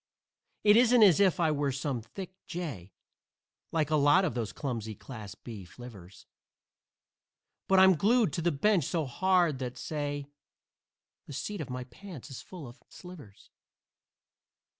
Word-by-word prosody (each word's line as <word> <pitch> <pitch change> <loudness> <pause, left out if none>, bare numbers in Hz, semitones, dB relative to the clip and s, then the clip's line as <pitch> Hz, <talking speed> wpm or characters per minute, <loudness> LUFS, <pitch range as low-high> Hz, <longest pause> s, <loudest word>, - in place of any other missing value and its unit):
It 210 0 +6
isn't 245 -1 +6
as 195 -3 +6
if 190 -4 +3
I 160 -2 +3
were 145 -2 0
some 135 -2 -3
thick 185 - -9
jay, 145 - -6 0.8
Like 155 -2 0
a - - +4
lot 145 +6 +4
of - - -1
those 115 -3 -3
clumsy 115 -6 -4
"Class 105 -6 -9
B" 110 -5 -9
flivvers, 95 -2 -13 1.4
But 190 - +4
I'm 190 0 +7
glued 210 - +2
to 170 - -2
the 175 +1 +2
bench 175 +2 +2
so 165 -1 -1
hard 175 0 +2
that, 125 -1 -5
say 145 0 -4 1.0
The - - -8
seat 200 +7 -4
of 145 - -6
my 125 0 -4
pants 150 +2 -11
is 130 - -7
full 175 -7 -10
of 120 +3 -14
slivers. 155 - -13
145 Hz, 150 wpm, -30 LUFS, 125-185 Hz, 1.4 s, I'm